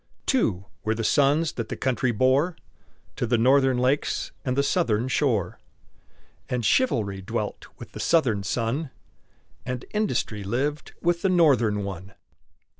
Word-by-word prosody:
Two 105 - +1 0.2
were 110 +1 0
the 115 - -3
sons 145 +6 +3
that 115 -2 -5
the - - -3
country 130 -1 0
bore 130 - +2 0.6
To 120 - -1
the 120 +1 +2
Northern 130 +2 +4
lakes 130 +4 0
and 130 -2 -2
the 140 - +3
Southern 115 -3 +1
shore; 120 - 0 0.9
And 125 -3 -1
Chivalry 105 - +1
dwelt 95 - -4
with - - -11
the - - -9
Southern 125 -12 +2
son, 120 +8 -2 0.7
And 125 0 -5
Industry 125 - -1
lived 140 +9 -2
with 170 0 +1
the 195 - +2
Northern 125 - +3
one. 95 0 -7
125 Hz, 140 wpm, -25 LUFS, 110-145 Hz, 0.9 s, Northern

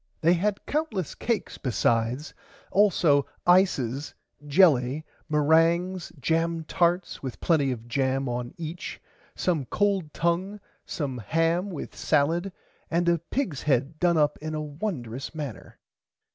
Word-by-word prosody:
They 170 +1 +5
had 200 +3 -1
countless 280 - -2
cakes 230 -3 -2
besides 120 +2 0 0.4
also 170 -8 +4 0.2
ices 150 -8 +2 0.3
jelly 145 -3 +4 0.2
merangs 165 +4 +2
jam 165 +3 0
tarts 175 +3 0
with 130 -3 -6
plenty 145 -6 +2
of 120 -2 -6
jam 135 +1 0
on 120 +3 -4
each 170 +3 -6 0.4
some 165 -7 0
cold 195 - 0
tongue 180 +6 -1 0.3
some 135 -5 -3
ham 165 - +1
with 170 -7 -6
salid 165 +6 +1 0.4
and 170 +1 +1
a 170 -1 +3
pig's 170 - -3
head 140 +1 0
done 175 -2 +3
up 150 -1 +2
in 155 0 -4
a 155 - -2
wondrous 145 - -5
manner. 145 -8 -7
160 Hz, 125 wpm, -26 LUFS, 140-175 Hz, 0.4 s, They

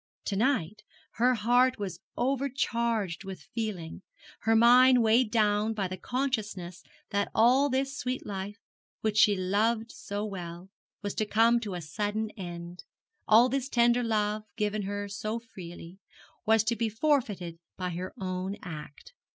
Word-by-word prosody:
To 200 - -1
night 215 - 0 0.4
her 250 +1 +5
heart 245 +4 +3
was 195 -5 -5 0.2
overcharged 235 -7 0
with 190 -1 -8
feeling, 205 -8 -4 0.4
her 225 +1 +2
mind 245 +2 +7
weighed 225 +1 +4
down 215 0 +2
by 195 -3 -1
the 185 - -5
consciousness 205 -6 -3 0.3
that 200 0 0
all 255 +6 +5
this 270 +2 -1
sweet 255 -2 -3
life, 200 +1 -5 0.4
which 215 -1 0
she 210 -1 +6
loved 215 +5 0
so 205 +1 -5
well, 180 -2 -7 0.3
was 205 - -2
to 215 - -1
come 230 +3 +4
to 205 -5 -5
a 175 - -4
sudden 210 +7 -2
end, 175 -1 -8 0.4
all 230 +3 +7
this 270 +1 -2
tender 240 0 +3
love, 215 -2 0 0.2
given 210 -1 0
her 205 +1 -3
so 215 +3 -3
freely, 180 -5 -10 0.5
was 220 -1 +5
to 230 +2 0
be 230 -1 0
forfeited 215 - 0 0.2
by 180 -1 -3
her 180 +2 -5
own 185 +1 -3
act. 155 - -9
215 Hz, 150 wpm, -29 LUFS, 190-235 Hz, 0.5 s, mind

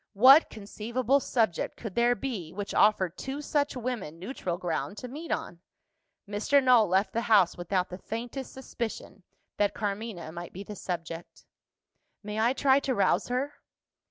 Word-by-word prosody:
What 260 +9 +8
conceivable 235 +5 -1
subject 225 -9 0
could 220 -5 -6
there 240 +2 +3
be, 200 -9 -5
which 205 +1 -5
offered 190 -4 +3
two 270 +2 -4
such 290 -1 0
women 230 -10 -4
neutral 180 -2 -4
ground 180 +3 -3
to 250 - -6
meet 305 +7 -7
on? 170 - -3 0.7
Mr. 205 +7 +1
Null 245 -4 +6
left 190 +3 +1
the 230 - 0
house 210 -7 +4
without 180 +1 -1
the 180 - -7
faintest 240 +6 -5
suspicion 230 -6 -6 0.4
that 205 -1 +1
Carmina 205 -5 -4
might 170 +1 -8
be 195 - -7
the 210 - -8
subject. 170 -2 -6 0.8
"May 210 +1 -4
I 235 +3 +3
try 270 0 +4
to 270 -2 -1
rouse 200 - +2
her?" 260 +4 -1
215 Hz, 155 wpm, -28 LUFS, 190-255 Hz, 0.8 s, What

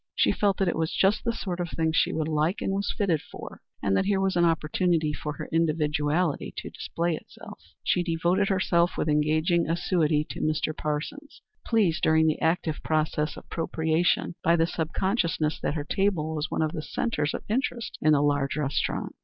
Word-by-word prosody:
She - - +3
felt 200 -2 +1
that 195 - +1
it 175 - +1
was 160 -1 0
just 195 +2 +2
the 235 - +1
sort 185 -6 -4
of 175 -1 -2
thing 160 -1 0
she - - +3
would 155 -1 -1
like 155 +4 0
and 195 - -1
was 200 +1 -1
fitted 175 -7 0
for, - - -10 0.2
and 100 -1 +2
that - - +2
here 195 -1 +2
was 195 -1 +1
an 175 0 +4
opportunity 160 0 +1
for 150 0 -4
her - - -6
individuality 155 0 0
to - - -6
display 170 0 -2
itself. - - -12 0.2
She 180 - +2
devoted 175 +3 +1
herself 175 -2 +2
with - - -1
engaging 155 +3 +2
assiduity 165 -3 +1
to - - -6
Mr. 155 0 0
Parsons, 155 - -5 0.2
pleased 205 -9 +2
during 160 0 +4
the 155 -1 +1
active 160 -1 0
process 155 -1 0
of - - -12
propitiation 160 +1 0
by 170 - +4
the 165 -1 +3
sub 160 -1 -3
consciousness 170 -6 0
that - - -1
her 150 - -2
table 165 -2 0
was 155 0 -2
one - - 0
of 155 - 0
the 160 -2 -4
centres 155 -3 -2
of - - -6
interest 235 0 -2
in 155 - +4
the 145 -1 +3
large 145 -1 +1
restaurant. 145 -2 -2
165 Hz, 195 wpm, -26 LUFS, 155-180 Hz, 0.2 s, an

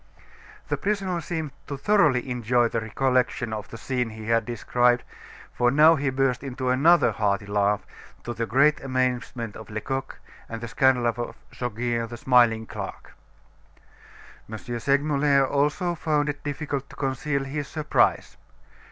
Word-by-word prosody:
'" - - -22
The - - 0
prisoner 195 -4 -1
seemed 160 -2 -4 0.2
to 140 - -5
thoroughly 140 -6 +3
enjoy 120 -1 +1
the 115 - -2
recollection 125 0 0
of 105 -1 -5
the 115 - -8
scene 125 0 -2
he 110 0 -9
had 115 -1 +2
described, 120 +1 +1 0.5
for 120 0 +2
he 125 - -1
now 155 +2 +7
burst 130 -1 0
into 130 -1 -3
another 165 +7 +5
hearty 100 -1 0
laugh, 100 0 0 0.4
to 120 - -4
the 115 -1 -3
great 140 +7 +3
amazement 125 -4 -2
of 110 - -10
Lecoq, 130 +5 -4 0.3
and 115 - -5
the 120 - -6
scandal 125 +1 +2
of 115 0 0 0.4
Goguet, 120 -1 -2
the 120 - -7
smiling 120 -3 +3
clerk. - - -8 1.4
M. 110 - -4
Segmuller 140 +4 +1
also 150 +6 0
found 150 -3 0
it 145 0 -5
difficult 145 -1 -4
to - - -13
conceal 140 +1 -1
his 140 +1 -4
surprise. 155 +2 +1
130 Hz, 150 wpm, -25 LUFS, 115-145 Hz, 1.4 s, now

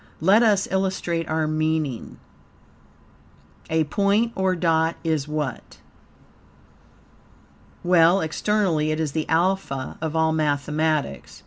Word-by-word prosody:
Let 195 +8 +4
us 210 -4 +3
illustrate 185 -3 -1
our 160 0 0
meaning. 155 -4 -2 1.5
A 160 0 +2
point 200 +8 +1
or 190 -1 +1
dot 165 -1 +1
is 155 -4 -1
what? 150 -5 -5 2.1
Well, 175 +1 +4
externally 160 -2 0
it 155 0 -1
is 155 -3 -1
the 155 +1 -3
alpha 165 -5 -1
of 160 0 -3
all 160 0 +2
mathematics. 150 - -1
160 Hz, 105 wpm, -23 LUFS, 155-185 Hz, 2.1 s, Let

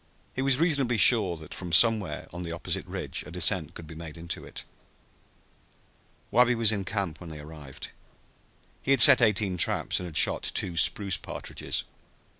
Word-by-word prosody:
He 130 - -3
was 135 -1 +1
reasonably 140 -7 +1
sure 100 -5 +4
that 80 -1 -11
from 90 -2 -8
somewhere 100 -4 +3
on 85 - -7
the 85 -1 -6
opposite 85 - -4
ridge - - -5
a - - -10
descent 90 -2 -1
could 85 - -9
be 80 - -11
made 80 0 -10
into 85 +1 -6
it. - - -10 1.7
Wabi 125 0 +3
was 115 -2 +4
in 100 -3 -3
camp 95 -5 -4
when 85 - -9
they 80 - -9
arrived. 75 -3 -11 0.9
He - - -8
had 135 - +4
set 135 -4 +9
eighteen 105 -4 +1
traps - - +2
and 90 - -6
had 80 - -5
shot - - +2
two 90 - -2
spruce 95 +3 +1
partridges. - - -5
90 Hz, 175 wpm, -26 LUFS, 80-115 Hz, 1.7 s, set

